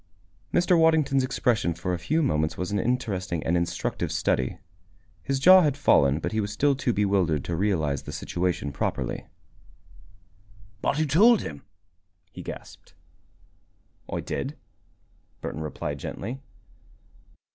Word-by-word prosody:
Mr. 175 +1 +3
Waddington's 155 -5 +3
expression 120 -9 0
for 90 +2 -3
a 90 - -2
few 155 - 0
moments 80 - 0
was 90 +1 -3
an 105 - 0
interesting 95 - -1
and 85 - +1
instructive 85 0 -2
study. 65 -1 0 0.6
His 135 - -1
jaw 185 +6 +8
had 145 -4 +1
fallen, 70 - +4
but 80 - -3
he 110 - -1
was 100 0 -3
still 140 +7 +2
too 130 -2 0
bewildered 95 - +1
to 85 - -2
realize 80 -8 0
the - - -8
situation 90 -5 -2
properly. - - -3 1.5
"But 145 - 0
who 155 - +2
told 205 - +5
him?" 70 -3 -7 0.7
he - - -9
gasped. - - -10 1.2
"I - - -2
did," - - -4 0.8
Burton 80 - -5
replied 75 -2 -4
gently. 120 - -6
100 Hz, 135 wpm, -26 LUFS, 80-140 Hz, 1.5 s, jaw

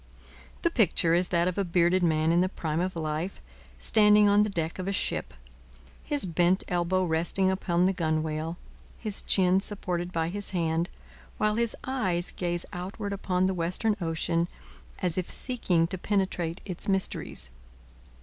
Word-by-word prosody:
The 340 - +2
picture 175 - +3
is 175 +1 +3
that 170 -1 +1
of 185 +2 -1
a - - +2
bearded 175 +1 +2
man 160 -1 +2
in 170 +1 +4
the 185 - +1
prime 160 -4 -3
of 185 +1 -1
life, 160 +3 -3 0.4
standing 210 -1 +5
on 205 +1 +5
the 210 - +2
deck 165 -3 -3
of 185 - -4
a - - 0
ship, 200 - -1 0.7
his 290 -5 +2
bent 175 +2 +2
elbow 180 +1 +1
resting 175 +3 +1
upon 180 -2 +1
the 190 - +2
gunwale, 160 -1 -1 0.4
his 215 -3 -3
chin 185 -1 +3
supported 180 -3 -3
by 165 -1 -1
his 205 +2 -4
hand, 165 +1 0 0.5
while 215 0 +2
his 230 +1 0
eyes 190 -10 -1
gaze 175 -1 -2
outward 200 +3 -5
upon 185 -2 0
the 190 - +1
western 185 +5 0
ocean 165 0 0 0.6
as 180 0 +1
if 180 - -4
seeking 190 -10 +1
to 185 +2 -3
penetrate 185 -4 -1
its 180 -3 -6
mysteries. 190 - -1
180 Hz, 160 wpm, -28 LUFS, 170-195 Hz, 0.7 s, standing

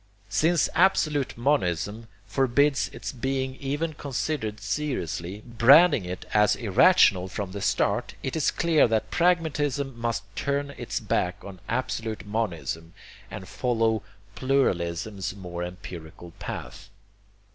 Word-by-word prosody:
Since 165 +1 +2
absolute 155 -8 +2
monism 110 - 0 0.2
forbids 135 +2 +2
its - - -6
being 130 +1 -2
even 145 +4 -2
considered 135 -6 -3
seriously, 105 - -3
branding 130 - +6
it 90 +1 -6
as 105 0 +4
irrational 100 - +4
from 95 0 -5
the 100 +1 -6
start, - - 0
it 130 - -3
is 160 - +2
clear 165 -5 +3
that 110 -1 -1
pragmatism 145 -6 +1
must 115 0 -1
turn 140 0 -1
its 140 - -4
back 90 +3 -1
on 95 -2 -9
absolute 115 -4 -2
monism, 85 -6 -3 0.3
and - - -8
follow 115 -3 0 0.3
pluralism's 95 -7 -1
more 90 -3 -6
empirical 85 -2 -9
path. - - -7
115 Hz, 115 wpm, -26 LUFS, 100-140 Hz, 0.3 s, branding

